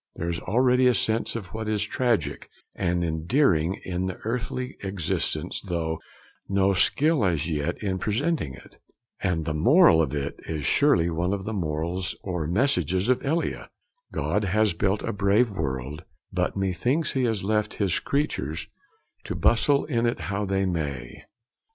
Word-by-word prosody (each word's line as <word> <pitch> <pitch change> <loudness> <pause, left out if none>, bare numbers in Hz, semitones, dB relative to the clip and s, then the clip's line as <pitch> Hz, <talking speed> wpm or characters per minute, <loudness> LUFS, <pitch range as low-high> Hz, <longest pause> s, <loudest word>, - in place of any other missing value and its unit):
There 85 - -3
is 85 - -3
already 125 +4 +3
a 125 - +4
sense 110 +1 0
of 100 -5 -6
what 110 0 -3
is 105 -1 +1
tragic 120 +1 -1 0.3
and 90 -2 0
endearing 85 - +2
in 90 0 -2
earthly 125 +3 -3
existence, 90 -3 -2
though 85 -4 -2 0.5
no 100 0 +3
skill 145 - +3
as 85 -5 +1
yet 75 -3 -1
in 95 -2 -1
presenting 115 - -1
it; - - -17 0.4
and 85 -4 0
the 80 - -1
moral 125 - +6
of 75 -2 -1
it 70 -1 -3
is 75 -4 -3
surely 85 +6 +3
one 90 +4 0
of 100 -1 -3
the 110 - -4
morals 85 0 -2
or 90 -5 -2
messages 95 - +1
of 130 - +2
Elia: 160 +5 -1 0.4
'God 105 0 0
has 105 +1 +2
built 95 +4 0
a - - -2
brave 100 +4 +3
world, 70 -3 -4 0.3
but 90 +1 -1
methinks 100 - 0
he 130 -2 +1
has 110 -5 -1
left 105 +1 0
his 100 -4 +1
creatures 85 - -2 0.6
to - - -3
bustle 140 +5 +3
in 120 -5 +1
it 120 - -1
how 100 +1 -1
they 95 0 0
may.' 80 -7 -4
95 Hz, 155 wpm, -26 LUFS, 85-115 Hz, 0.6 s, moral